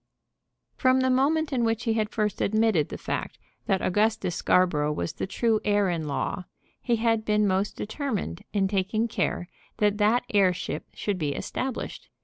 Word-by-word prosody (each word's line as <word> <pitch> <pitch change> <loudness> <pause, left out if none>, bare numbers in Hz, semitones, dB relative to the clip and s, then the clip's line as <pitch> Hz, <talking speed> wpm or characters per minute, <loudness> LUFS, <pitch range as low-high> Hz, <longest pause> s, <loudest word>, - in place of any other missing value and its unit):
From 260 0 +3
the 260 0 +2
moment 295 +4 +2
in 245 -2 +1
which 225 0 0
he 225 - +1
had 215 -1 0
first 210 -3 -1
admitted 215 -7 +2
the - - -5
fact - - -4 0.3
that 195 -3 +1
Augustus 205 -1 +1
Scarborough 155 -5 +2
was 85 - -3
the - - -4
true 220 +2 +1
heir 205 -2 +2
at 170 -2 -1
law, 150 +4 -3 0.4
he 240 - +1
had 225 -1 +1
been 210 0 +2
most 195 +1 0
determined 215 - -3
in 200 -2 +1
taking 205 +3 0
care 180 -5 -1 0.3
that 210 0 +2
that 220 +4 +3
heirship 185 -3 +1
should 200 -3 -2
be 145 -3 -1
established. 260 - -4
210 Hz, 165 wpm, -26 LUFS, 185-230 Hz, 0.4 s, From